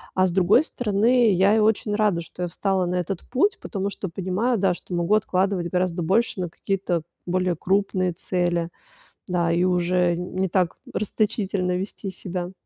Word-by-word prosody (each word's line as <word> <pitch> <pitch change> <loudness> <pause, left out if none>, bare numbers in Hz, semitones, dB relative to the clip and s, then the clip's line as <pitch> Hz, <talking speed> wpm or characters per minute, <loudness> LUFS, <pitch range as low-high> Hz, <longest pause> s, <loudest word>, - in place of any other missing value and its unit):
А 185 - +4
с 185 - 0
другой 190 - +4
стороны, 230 -3 +2
я 195 +3 +4
и - - +4
очень 210 -1 +2
рада, 205 -5 +2
что 180 +2 -7
я - - 0
встала 190 +1 0
на 175 +1 -2
этот 180 0 -2
путь, 345 +11 +1
потому 195 -1 -3
что 200 - -5
понимаю, 190 +7 -1
да, 190 -2 +2
что 175 - -9
могу 175 +4 +2
откладывать 190 -3 0
гораздо 180 0 0
больше 190 +4 +1
на 175 - -2
какие-то 185 -1 -2 0.2
более 180 -1 0
крупные 185 -1 0
цели. 175 -1 -1 0.6
Да, 170 -2 +1
и 175 +2 +2
уже 180 -1 +2
не 185 +1 -2
так 180 -2 0 0.2
расточительно 200 -3 -1
вести 195 +1 -5
себя. 180 -1 -5
185 Hz, 170 wpm, -24 LUFS, 175-200 Hz, 0.6 s, А